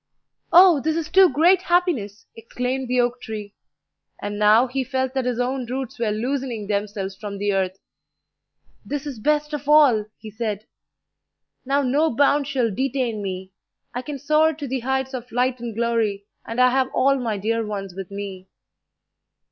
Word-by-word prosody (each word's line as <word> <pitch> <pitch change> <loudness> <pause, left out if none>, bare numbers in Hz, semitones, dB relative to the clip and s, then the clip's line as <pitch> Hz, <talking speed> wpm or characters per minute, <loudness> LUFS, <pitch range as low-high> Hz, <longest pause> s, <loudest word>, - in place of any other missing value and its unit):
"Oh, 350 -3 +7
this 315 +3 -1
is 325 -2 -3
too 380 -1 +6
great 340 +7 +4
happiness!" 345 - 0
exclaimed 250 +3 -3
the 250 +1 +1
oak 245 0 0
tree; 210 -3 -7 0.7
and 205 0 -5
now 215 +4 +5
he 265 +1 -2
felt 260 0 -2
that 265 -2 -1
his 250 -1 -1
own 250 0 -1
roots 255 -1 -5
were 230 -2 0
loosening 240 0 -2
themselves 200 -1 -3
from 200 0 -7
the 205 0 0
earth. 190 -1 -1 1.1
"This 290 0 -4
is 275 -6 -6
best 300 +5 0
of 290 -1 -4
all," 280 -9 +5
he 215 - -10
said. 215 -1 -4 1.0
"Now 280 +2 +1
no 290 +5 +2
bounds 285 +1 +3
shall 250 -6 0
detain 255 -2 -1
me. 190 -1 -5 0.4
I 245 - -3
can 290 +2 -6
soar 305 +3 +3
to 290 -1 -6
the 265 +1 -2
heights 265 +2 -2
of 250 -1 -6
light 250 +1 0
and 235 -2 -6
glory, 225 -4 0 0.2
and 230 +2 -4
I 250 0 +5
have 260 0 +1
all 275 +1 +3
my 225 -4 -2
dear 225 +3 -1
ones 200 -3 -5
with 190 -1 -7
me." 200 -2 -7
250 Hz, 170 wpm, -22 LUFS, 210-275 Hz, 1.1 s, Oh